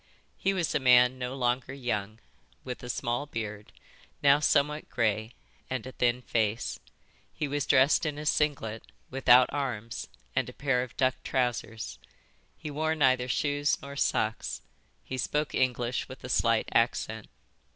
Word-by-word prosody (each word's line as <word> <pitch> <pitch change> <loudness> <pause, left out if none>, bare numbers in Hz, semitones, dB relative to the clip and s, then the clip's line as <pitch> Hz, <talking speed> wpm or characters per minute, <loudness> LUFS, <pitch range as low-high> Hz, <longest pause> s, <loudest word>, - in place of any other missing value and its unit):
He 195 - 0
was 180 -4 -1
a - - +2
man 125 -1 +5
no 125 +1 -3
longer 125 +1 -1
young, 110 -5 -3 0.5
with 125 -1 -6
a 125 - -8
small 120 +4 -2
beard, 105 -4 -6 0.5
now 140 +1 +6
somewhat 150 0 +1
grey, 110 +1 0 0.4
and 130 -2 -3
a 130 - -6
thin 125 0 0
face. 110 -1 -1 0.5
He 150 - -3
was 145 0 -2
dressed 135 +2 +5
in 145 -1 -3
a 150 - -6
singlet, 140 -8 0 0.3
without 130 -1 +5
arms, 120 -6 -3 0.3
and - - +1
a - - -10
pair 135 -3 +1
of 125 - -7
duck 130 -1 +1
trousers. 120 -3 -2 0.6
He 150 - -6
wore 155 +2 0
neither 130 -4 +3
shoes 145 +2 +1
nor 140 0 -8
socks. 110 -5 -1 0.4
He 130 - -5
spoke 150 +3 -1
English 125 -1 0
with - - -10
a - - -6
slight - - +2
accent. - - +1
130 Hz, 150 wpm, -29 LUFS, 120-145 Hz, 0.6 s, now